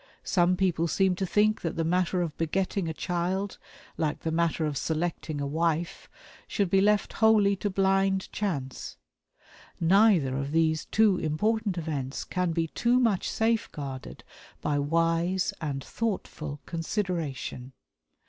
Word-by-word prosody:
Some 180 -1 +2
people 175 -3 +1
seem 190 +2 +2
to 190 - -1
think 215 +3 +2
that 165 - -3
the 165 - 0
matter 180 +2 +1
of 160 -3 -4
begetting 185 +2 -1
a - - -1
child, 180 +4 -2 0.4
like 155 -2 -1
the 160 - -2
matter 165 -1 +1
of 150 -2 -2
selecting 160 0 -2
a 140 - -1
wife, 165 +3 -1 0.4
should 200 -5 -1
be 195 - +5
left 210 0 +2
wholly 215 -3 +4
to 205 - -2
blind 195 0 +1
chance. 140 -11 -4 0.8
Neither 175 -6 +4
of 140 +2 -3
these 160 -1 +2
two 215 -4 +3
important 205 +5 0
events 145 -5 -3
can 180 -2 -1
be 165 0 0
too 240 +7 +2
much 225 -7 +1
safeguarded 150 - -2 0.4
by 145 -1 0
wise 165 +6 +1
and 140 -4 -3
thoughtful 160 -9 -4
consideration. 165 - -3
175 Hz, 140 wpm, -28 LUFS, 155-195 Hz, 0.8 s, be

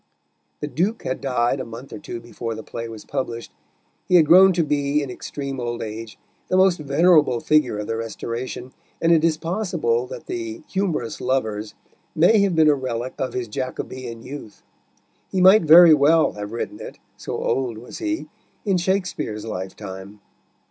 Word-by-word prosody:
The 150 - -2
Duke 190 +10 -1
had 130 - -3
died 125 -1 0
a - - -3
month 115 +4 -10
or 110 - -7
two 120 - -7
before 115 -1 -6
the 110 - -8
play 115 0 -6
was 110 -2 -10
published; 120 -4 -4 0.6
he 180 - +3
had 165 -3 +7
grown 185 +5 +7
to 170 -1 +1
be, 145 0 0
in 135 - -6
extreme 135 +1 -6
old 120 -1 -3
age, 110 0 -7 0.3
the 185 - +1
most 185 -2 +4
venerable 150 -3 +3
figure 140 -5 +2
of 105 - -4
the 115 - -3
Restoration, 115 +3 -5 0.3
and 165 - +2
it 160 -2 +4
is 165 -2 +2
possible 165 - -1
that - - -9
the 340 -2 -5
Humorous 180 - -2
Lovers 110 -5 -2 0.4
may 180 +7 +5
have 200 -3 +2
been 160 -1 +5
a 150 - +6
relic 130 -2 -3
of 130 - -2
his 125 -2 -3
Jacobean 125 0 -6
youth. 125 -6 -10 0.7
He 190 - 0
might 190 +4 +7
very 165 +1 +9
well 155 +2 +4
have 105 0 -7
written 115 - -5
it, - - -9 0.2
so - - -5
old 125 -4 -1
was 120 +3 -10
he, 320 -1 -3 0.4
in 195 -3 +2
Shakespeare's 180 - -2
lifetime. 95 0 -7
135 Hz, 175 wpm, -22 LUFS, 115-170 Hz, 0.7 s, very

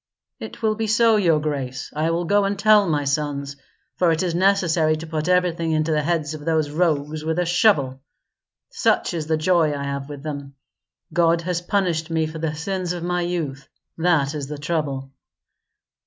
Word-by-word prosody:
"It - - -9
will 215 -1 +3
be 220 +1 -3
so, 225 +1 +4
your 170 -6 +3
grace. 140 -4 -4
I 155 +2 0
will 170 +1 -1
go 205 +4 +3
and 200 0 -1
tell 210 -2 +5
my 150 -2 +1
sons, 140 -1 -2 0.4
for 175 -2 +3
it 160 +2 0
is 175 -2 -1
necessary 175 -4 +2
to 155 +1 -7
put 155 0 -3
everything 170 -3 +1
into 155 +1 +1
the 150 -1 +2
heads 155 -1 -1
of 150 -1 -8
those 155 -2 0
rogues 155 -2 0
with 160 +1 -1
a 180 - +1
shovel. 160 - +2 0.7
Such - - +1
is 160 -3 -3
the 160 0 +1
joy 160 -2 +2
I 140 - -4
have 140 0 -4
with 145 -1 -8
them. 140 -2 -6 0.6
God 170 -1 +3
has 175 0 -2
punished 175 -4 -1
me 160 -1 +1
for 160 +1 -6
the 155 -1 -2
sins 180 +2 -3
of 175 -1 -5
my 180 0 -1
youth; 160 -6 -3 0.3
that 160 -4 +1
is 145 -3 -4
the 150 +1 -6
trouble. 145 -3 -3
160 Hz, 190 wpm, -22 LUFS, 150-175 Hz, 0.7 s, tell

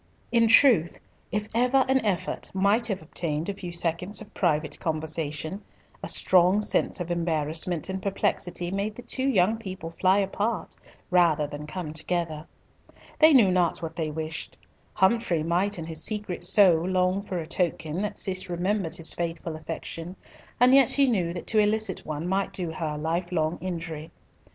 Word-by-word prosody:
In 230 -1 +4
truth, 225 - +5 0.3
if 210 0 -2
ever 250 +3 +3
an 265 -1 +2
effort 195 -6 -2
might 205 +5 +2
have 195 -7 -3
obtained 160 +1 -3
a - - -1
few 180 -3 -7
seconds 175 +3 0
of 215 - -12
private 155 -4 0
conversation, 160 +2 -3 0.4
a - - -5
strong 185 +2 +4
sense - - +1
of 175 -1 -4
embarrassment 165 0 0
and 190 0 -4
perplexity 180 -2 -1
made 200 +2 -2
the 245 - -10
two 260 +2 0
young 215 -2 +2
people 190 -6 -7
fly 185 +3 +2
apart 205 +3 -2 0.4
rather 170 -4 +3
than 145 +1 -8
come 155 -1 -6
together. 160 -1 -3 0.7
They 315 0 +7
knew 230 -10 +6
not 180 -2 +1
what 165 0 -5
they 160 -3 -2
wished. 155 0 -5 0.4
Humfrey 190 -5 +2
might 180 +5 0
in 165 - -5
his 160 -1 -5
secret 210 -5 -3
soul 180 -2 +5
long 185 +1 +1
for 195 -2 -5
a 165 - -4
token 170 0 -2
that 210 0 -3
Cis 185 -1 -2
remembered 180 0 -1
his 165 -3 0
faithful 170 -1 -4
affection, 165 +2 -6 0.4
and 250 +2 +6
yet 270 -3 +6
he 280 -1 +4
knew 185 -9 0
that 175 0 -6
to 220 - +2
elicit 215 +1 +1
one 155 +2 -4
might 195 +1 -1
do 180 -4 -3
her 155 -2 -4
life 170 +4 -2
long 160 -1 -1
injury. 165 -4 -5
180 Hz, 170 wpm, -26 LUFS, 165-205 Hz, 0.7 s, They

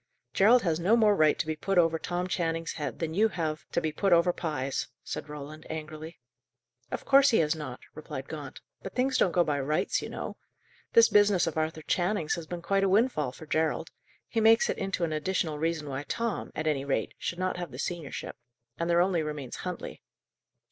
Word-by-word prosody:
"Gerald 230 +5 +5
has 165 -3 +1
no 200 +7 +4
more 215 -3 +5
right 155 -4 +4
to - - -1
be 155 0 -2
put 195 +5 -1
over 165 -2 +4
Tom 175 +2 -2
Channing's 165 -2 -1
head, 150 - -4
than 160 -1 -3
you 210 +6 +4
have 165 -5 -4
to - - +1
be 160 -2 -1
put 195 +5 0
over 175 +1 +5
Pye's," 145 -6 -2 0.2
said - - -6
Roland, 150 +1 -8
angrily. 155 +1 -7 0.7
"Of - - -5
course 275 0 +6
he 230 - +4
has 155 -1 +3
not," 140 -5 -6
replied 140 -3 -7
Gaunt. 145 -4 -8 0.2
"But 195 - -8
things 260 +1 +1
don't 180 - +3
go 175 +1 +3
by 150 -3 -1
'rights,' 150 +3 0
you - - -6
know. - - -6 0.6
This 460 -1 +8
business 205 -3 +4
of 165 - -3
Arthur 160 0 -2
Channing's 175 0 0
has 170 -2 -5
been 175 0 -6
quite 195 +2 +1
a 195 - +3
windfall 195 - +2
for 160 - -12
Gerald; 160 +1 0 0.4
he 225 - -1
makes 225 +1 +5
it - - -5
into 195 -2 -2
an 160 -2 0
additional 155 -1 -1
reason 160 -1 -1
why 135 0 -3
Tom, 230 -2 -2
at 155 - -3
any 150 -3 +1
rate, 140 -1 -1
should 170 - -3
not 185 0 -1
have 175 -2 -4
the 125 - -10
seniorship. 165 0 -4 0.5
And 170 0 -1
there 170 0 +4
only 180 -2 +2
remains 150 -5 -5
Huntley." 180 -1 -6
165 Hz, 210 wpm, -29 LUFS, 155-190 Hz, 0.7 s, This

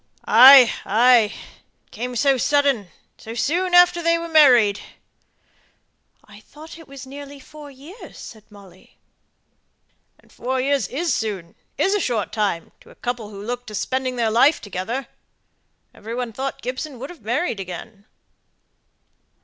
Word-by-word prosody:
"Ay, 255 +1 +8
ay. 240 +3 +4 0.6
It - - -39
came 245 +2 -6
so 275 +3 +2
sudden, 275 -4 +1 0.3
so 225 +1 -9
soon 355 +9 0
after 355 0 +5
they 335 0 +2
were 335 0 -6
married." 250 -11 +5 1.5
"I 205 -1 -16
thought 310 +8 -14
it 325 - -15
was 275 -1 -11
nearly 280 +1 -11
four 295 +2 -13
years," 285 - -14
said 220 -2 -12
Molly. 195 -3 -18 1.2
"And - - -26
four 260 +1 -3
years 275 +1 0
is 315 +2 -2
soon 195 -6 -4 0.2
is 390 - +1
a 415 - +1
short 235 - -2
time 205 -6 -2
to - - -19
a - - -17
couple 240 -4 -5
who 200 -1 -10
look 245 +1 -5
to 215 - -8
spending 260 +3 -2
their 230 -2 0
lifetime 270 +7 +3
together. 220 +6 -5 0.9
Every 225 +2 -8
one 245 -2 -4
thought 270 +4 -5
Gibson 260 +3 -5
would 270 +6 -8
have 350 - -15
married 235 - -2
again." 195 +3 -9
250 Hz, 150 wpm, -21 LUFS, 220-285 Hz, 1.5 s, Ay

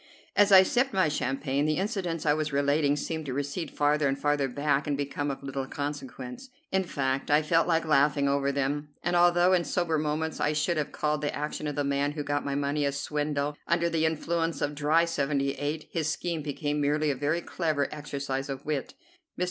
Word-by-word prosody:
'" - - -28
As 205 0 +5
I 190 -1 +10
sipped 245 +6 +1
my 185 -5 +3
champagne, 140 0 -1
the 155 - +1
incidents 185 -5 -2
I 150 - +4
was 155 0 -1
relating 145 +1 +2
seemed 160 +1 -4
to 130 - -3
recede 145 +5 -3
farther 150 0 +2
and 135 0 0
farther 145 -1 +1
back 145 +2 0
and 145 -1 0
become 145 0 -2
of 140 0 -5
little 135 -1 -4
consequence. 140 - -6 0.2
In 190 0 +2
fact 135 -5 -2
I 150 +1 +4
felt 165 +2 +2
like 165 -1 +2
laughing 145 -1 +3
over 140 0 +1
them, 140 +2 -1
and 175 +1 0
although 175 +1 +5
in 180 -2 +3
sober 165 -3 0
moments 155 +1 -2
I 150 - +1
should 155 +3 0
have 150 - -1
called 150 0 -1
the 145 - -2
action 150 +1 -3
of 145 - -3
the 145 - 0
man 140 +1 0
who 150 -1 -3
got 145 0 -1
my 140 -1 -2
money 145 +1 0
a 140 - +1
swindle, 145 +1 -2
under 170 0 +1
the 160 -1 +2
influence 165 +1 -1
of 145 0 -1
dry 155 +3 +3
'78 145 0 -1
his 160 -2 -1
scheme 165 +1 -2
became 145 0 -2
merely 150 +1 +2
a - - -2
very 145 +6 0
clever 155 -5 -1
exercise 140 -2 -4
of 135 -1 -5
wit. 150 -3 -3 0.4
Mr. - - -9
150 Hz, 210 wpm, -28 LUFS, 140-160 Hz, 0.4 s, I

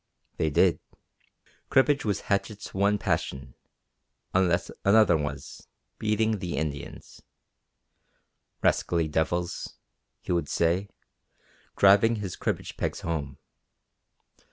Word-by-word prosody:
They 80 - +1
did. 85 +4 +3 0.9
Cribbage 140 +2 +3
was 105 -3 -1
Hatchett's 100 +1 -2
one 100 +2 +2
passion, 65 -7 -2 0.8
unless 90 -1 +2
another 105 -1 +5
was 75 -2 -5 0.3
beating 110 0 +1
the 90 -1 -4
Indians. 75 -3 -5 1.4
"Rascally 85 -2 +2
devils," 85 +3 -2 0.4
he - - -6
would 85 -1 0
say, 90 +4 +1 0.9
driving 100 +4 +5
his 100 -4 -5
cribbage - - -3
pegs - - -3
home. 75 -5 -3
90 Hz, 95 wpm, -27 LUFS, 80-105 Hz, 1.4 s, another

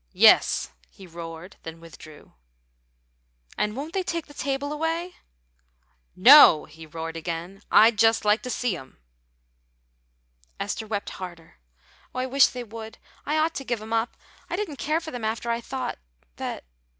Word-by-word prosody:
"Yes," - - +5 0.2
he 190 - -14
roared, 170 +1 -9
then 165 0 -9
withdrew. 155 -2 -14 1.2
"And 210 +1 -1
won't 295 +5 -6
they 385 - 0
take 335 -3 -3
the 290 - -15
table 280 +1 -3
away?" 330 +3 -2 1.0
"No," 215 - +9
he 160 +1 -13
roared 165 +1 -6
again. 170 +4 -5
"I'd 220 -1 +6
just 225 -1 +4
like 210 +2 +3
to 255 - -6
see 245 -5 -1
'em!" 135 -6 -12 1.6
Esther 220 - -4
wept 205 -2 -3
harder. 170 - -10 0.6
"Oh, - - -2
I 255 - 0
wish 265 +1 +5
they 250 -1 -6
would; 225 0 -9 0.3
I 300 +2 +1
ought 315 +1 +1
to 275 - -5
give 240 -3 -2
'em 220 +1 -7
up. 225 +1 -1 0.3
I - - -2
didn't 355 -9 -4
care 305 +7 0
for 320 - -7
them 245 -2 -6
after 225 +2 -2
I 235 0 -1
thought 255 +1 -5 0.4
that. - - -5
225 Hz, 160 wpm, -25 LUFS, 175-280 Hz, 1.6 s, No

